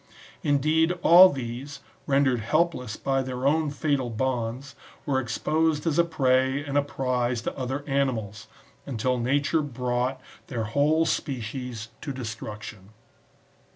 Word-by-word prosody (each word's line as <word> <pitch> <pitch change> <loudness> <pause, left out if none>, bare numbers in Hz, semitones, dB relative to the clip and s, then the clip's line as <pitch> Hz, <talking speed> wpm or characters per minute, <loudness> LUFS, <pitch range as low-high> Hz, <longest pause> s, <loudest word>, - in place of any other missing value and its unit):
Indeed 155 +4 +2
all 180 +3 +9
these, 130 +1 -6 0.3
rendered 135 -3 +3
helpless 125 -1 0
by 135 -1 0
their 130 0 -4
own 155 +2 +2
fatal 140 -3 -1
bonds, 125 +2 -2 0.3
were 135 -3 +1
exposed 150 +5 0
as 165 -1 +1
a - - +7
prey 130 -4 +2
and 140 -1 -4
a 145 - +5
prize 125 -3 -1
to - - -3
other 130 +2 -3
animals^ 130 -8 -2 0.4
until 125 -1 -1
nature 145 +6 +1
brought 125 -1 -2 0.3
their 120 -4 -3
whole 145 +8 +2
species 125 -5 -3
to 145 - -4
destruction. 110 -5 -7
130 Hz, 125 wpm, -26 LUFS, 120-145 Hz, 0.4 s, all